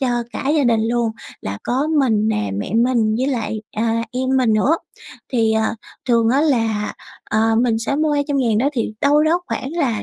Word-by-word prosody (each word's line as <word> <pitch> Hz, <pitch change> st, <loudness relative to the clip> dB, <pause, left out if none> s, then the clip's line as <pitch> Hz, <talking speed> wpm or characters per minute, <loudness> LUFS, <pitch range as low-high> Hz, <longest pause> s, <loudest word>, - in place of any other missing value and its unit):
cho 260 Hz, -, +1 dB, 0.2 s
cả 270 Hz, -, -3 dB
gia 285 Hz, -, +2 dB
đình 230 Hz, -2 st, +3 dB
luôn, 235 Hz, -1 st, +1 dB, 0.3 s
là 100 Hz, +1 st, -5 dB
có 265 Hz, +5 st, 0 dB
mình 220 Hz, -5 st, +2 dB
nè, 105 Hz, -, -1 dB
mẹ 100 Hz, -, -4 dB
mình 230 Hz, -2 st, +2 dB
với 260 Hz, -, 0 dB
lại, 225 Hz, -5 st, -2 dB, 0.2 s
à, 230 Hz, +1 st, 0 dB
em 260 Hz, +1 st, -2 dB
mình 245 Hz, -4 st, +3 dB
nữa. 250 Hz, +10 st, +3 dB, 0.6 s
Thì, 225 Hz, -2 st, +2 dB
ờ, 220 Hz, 0 st, +1 dB, 0.3 s
thường 230 Hz, -1 st, +3 dB
á 270 Hz, +4 st, +3 dB
là, 225 Hz, -8 st, +1 dB, 0.4 s
ờ, 225 Hz, +1 st, +2 dB
mình 230 Hz, -3 st, +1 dB
sẽ 255 Hz, +5 st, -2 dB
mua 305 Hz, 0 st, +1 dB
200.000 275 Hz, -6 st, +1 dB
đó 270 Hz, +4 st, +2 dB
thì 230 Hz, -5 st, -2 dB
đâu 290 Hz, +1 st, +4 dB
đó 330 Hz, +3 st, +2 dB
khoảng 270 Hz, -, -4 dB
là 270 Hz, -11 st, -1 dB
235 Hz, 200 wpm, -20 LUFS, 220-275 Hz, 0.6 s, đâu